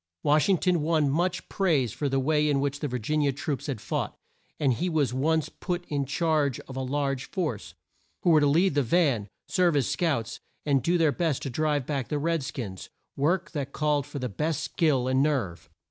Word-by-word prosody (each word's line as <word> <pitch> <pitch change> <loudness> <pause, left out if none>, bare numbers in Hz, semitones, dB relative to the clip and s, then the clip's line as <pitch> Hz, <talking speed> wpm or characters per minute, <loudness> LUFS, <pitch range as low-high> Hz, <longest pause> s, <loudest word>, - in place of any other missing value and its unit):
Wash 150 +5 +3
ing 190 - +5
ton 175 -1 +1
won 155 -2 +2
much 175 +4 0
praise 150 - +1
for 145 - -2
the 135 0 +1
way 150 +2 +2
in 140 -2 +2
which 140 0 -1
the 145 - -2
Vir 125 -2 -2
gin 150 +7 0
i - - +2
a 140 - +3
troops 135 0 -4
had 135 -6 -3
fought, 110 - -3 0.4
and 140 -4 +3
he 175 +11 -1
was 155 -6 +1
at 125 - -3
once 160 +2 +2
put 175 -2 -4
in 140 -2 -1
charge 150 -3 +1
of 130 - -11
a 130 - -2
large 135 0 -2
force, 135 - -3 0.5
who 175 - +4
were 155 - +6
to 145 - +3
lead 165 +5 +3
the 145 - +3
van, 135 - +2 0.2
serve 180 -4 +2
as 140 -5 +2
scouts, 130 -10 -1 0.3
and 140 -3 +3
do 175 +5 +2
their 160 -3 +3
best 160 -3 -1
to 135 - -3
drive 150 0 0
back 135 -4 -2
the 150 - -1
red 165 +2 0
skins 110 -8 -6 0.3
work 170 +6 0
that 140 -3 -4
called 150 -2 0
for 145 - -7
the 125 -2 -2
best 150 +7 -2
skill 150 -5 +1
and 130 +1 +2
nerve. 130 - -1
145 Hz, 225 wpm, -27 LUFS, 135-160 Hz, 0.5 s, were